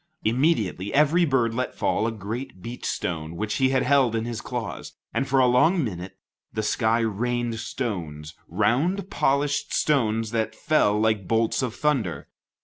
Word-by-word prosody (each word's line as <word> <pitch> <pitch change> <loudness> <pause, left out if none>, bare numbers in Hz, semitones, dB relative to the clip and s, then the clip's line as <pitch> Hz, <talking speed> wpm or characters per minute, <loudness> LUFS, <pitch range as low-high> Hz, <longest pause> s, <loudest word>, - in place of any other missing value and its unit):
Immediately 110 - +1
every 155 +4 +4
bird 125 -6 +1
let 130 +2 -2
fall 110 - 0
a - - -1
great 115 +2 -6
beach 120 +1 -7
stone 80 -1 -3
which 105 +3 -2
he 130 -1 +3
held 130 -2 +3
in 115 0 -1
his 115 -2 -4
claws, 120 -5 -5 0.2
and 135 - 0
for 135 0 +2
a 130 - +6
long 155 +8 +4
minute, 95 -5 -6 0.3
the 110 - -2
sky 110 +2 +1
rained 115 +1 -1
stones, 85 - -4
round, 175 - 0
polished 140 +2 +1
stones 115 -6 +1
that 110 -1 -1
fell 105 -9 +2
like 110 -4 +1
bolts 115 +2 +1
of 125 -3 -2
thunder. 115 - -1
115 Hz, 155 wpm, -25 LUFS, 110-135 Hz, 0.3 s, a